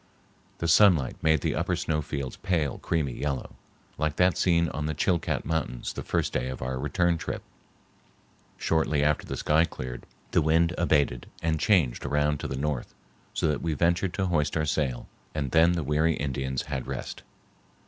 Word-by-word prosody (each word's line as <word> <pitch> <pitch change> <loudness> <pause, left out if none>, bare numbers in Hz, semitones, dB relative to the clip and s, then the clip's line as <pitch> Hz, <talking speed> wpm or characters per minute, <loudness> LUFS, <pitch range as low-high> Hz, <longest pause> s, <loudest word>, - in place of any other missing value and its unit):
The 85 - -2
sunlight 85 - +4
made 80 -2 +3
the - - 0
upper - - 0
snow 75 -1 -1
fields 70 -3 -4
pale 80 -7 -1
creamy 75 -6 -1
yellow, 70 -1 -3 0.5
like 75 0 0
that 90 0 +3
seen 85 -2 +3
on 75 +1 -3
the 80 - -2
Chilcat 80 -3 0
mountains 75 -6 -2
the - - -5
first - - -1
day 65 - -1
of 65 - -5
our 65 +1 -3
return 85 +4 +1
trip. - - -4 1.1
Shortly 80 -2 +1
after 75 0 +1
the - - -4
sky 75 +2 +3
cleared, 65 -5 -7 0.2
the - - +4
wind 80 +2 +3
abated 75 -7 +1 0.2
and 80 -1 +1
changed 85 - +2
around 75 0 +1
to - - -4
the 65 - -4
north, 70 -2 -3 0.4
so - - +1
that 75 - -1
we 80 -2 -1
ventured 85 +3 +1
to 95 - 0
hoist 75 -4 +1
our 80 - +1
sail, 70 -5 -1 0.3
and 70 -4 -2
then 85 +2 +5
the 85 -2 -1
weary 75 +3 +2
Indians 65 -2 -2
had 65 -3 -4
rest. - - -5
75 Hz, 180 wpm, -27 LUFS, 70-85 Hz, 1.1 s, then